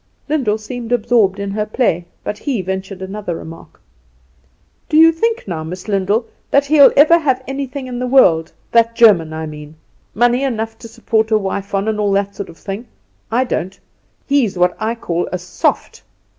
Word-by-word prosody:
Lyndall 265 -9 0
seemed 235 +2 -7
absorbed 230 -5 +2
in 200 0 -3
her 210 +1 -1
play; 195 -7 0 0.2
but 210 - -4
he 255 -10 -2
ventured 190 +1 -5
another 195 -2 -5
remark. 165 0 -11 1.1
"Do 305 - +2
you 325 +1 +8
think 450 - -1
now, 165 -4 -4
Miss 180 +5 -8
Lyndall, 205 +3 0 0.2
that 280 0 +3
he'll 285 -1 +6
ever 315 +4 +7
have 265 -4 0
anything 270 0 -5
in 245 -1 -5
the 250 - -2
world 170 -12 +4 0.2
that 230 0 +3
German. 195 -10 +5
I 160 0 -5
mean 150 0 -10 0.4
money 240 +4 +2
enough 225 -4 -3
to - - -10
support 220 0 -1
a 220 - +3
wife 200 0 -3
on, 195 +2 -1
and 215 -1 -1
all 205 -1 +1
that 200 0 -1
sort 200 - -6
of 165 - -13
thing? 205 +5 -7 0.4
I 245 +3 +2
don't. 190 -6 -4 0.5
He's 250 -9 +1
what 180 0 +2
I 225 +1 -1
call 175 -6 -3
soft." 180 0 -2
215 Hz, 180 wpm, -17 LUFS, 190-250 Hz, 1.1 s, you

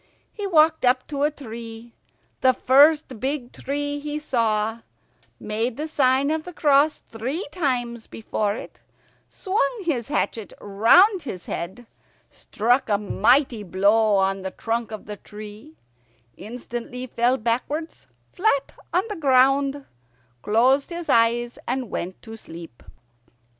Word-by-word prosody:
He 410 -2 -4
walked 320 -3 +4
up 255 +1 +3
to 285 -2 -3
a 295 - +3
tree, 230 -4 -9 0.5
the 260 -1 +4
first 280 -1 +4
big 265 -1 -3
tree 290 +1 -3
he 295 +1 -4
saw, 225 -6 0 0.6
made 225 +3 -2
the 305 +2 -3
sign 275 -1 +2
of 315 0 -1
the 360 - -9
cross 290 +1 +3
three 255 - -3
times 245 -8 -2
before 210 -2 -2
it, - - -10 0.5
swung 420 +3 -1
his 265 -10 -1
hatchet 230 -7 -2
round 245 - +4
his 185 - -7
head, 190 +8 -6 0.5
struck 240 +4 0
a 205 - +3
mighty 230 +4 +2
blow 205 +3 +3
on 195 0 +1
the 190 - -4
trunk 230 +3 -3
of 215 -1 -8
the 210 -1 -7
tree, 215 +9 -12 0.6
instantly 240 +3 -7
fell 245 +1 +1
backwards 255 +8 -3 0.3
flat 355 -8 +1 0.2
on 360 - +2
the 420 - -5
ground, 275 -1 +3 0.6
closed 250 - +3
his 345 -1 -6
eyes, 235 +1 +2
and 250 -3 -2
went 180 +2 -4
to 225 -1 -9
sleep. 165 - -11
250 Hz, 130 wpm, -23 LUFS, 220-290 Hz, 0.6 s, walked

